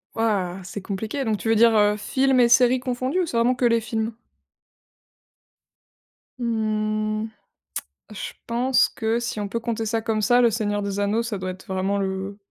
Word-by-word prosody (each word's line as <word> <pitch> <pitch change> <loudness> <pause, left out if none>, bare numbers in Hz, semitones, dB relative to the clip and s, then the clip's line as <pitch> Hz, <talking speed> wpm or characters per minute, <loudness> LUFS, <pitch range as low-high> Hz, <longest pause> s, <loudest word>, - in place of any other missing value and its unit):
Ouah! 195 -5 0
C'est 200 +3 -7
compliqué, 215 +8 -3
donc 220 -2 0
tu 225 - -2
veux 225 - +4
dire, 230 +1 +5
heu, 210 0 +4
films 265 +5 +2
et 240 - +6
séries 245 +1 +5
confondus, 255 +6 -1
ou - - +1
c'est 245 - -3
vraiment 240 +2 +3
que 245 - 0
les 230 -1 +3
films? 225 0 -2 2.3
Mmh, 215 -2 -1 0.8
je 210 - -6
pense 245 +2 +3
que 225 0 -1
si 235 -2 -4
on 205 - -2
peut 230 +4 -3
compter 230 -1 -2
ça 225 +1 -1
comme 220 -1 -1
ça, 245 +4 +4
le 235 -1 +4
Seigneur 205 -2 -1
des 200 0 -3
Anneaux, 205 +3 +1
ça 230 -3 -3
doit 185 0 -4
être 185 +1 -12
vraiment 190 +1 -1
le 190 +1 -3
220 Hz, 180 wpm, -23 LUFS, 205-235 Hz, 2.3 s, et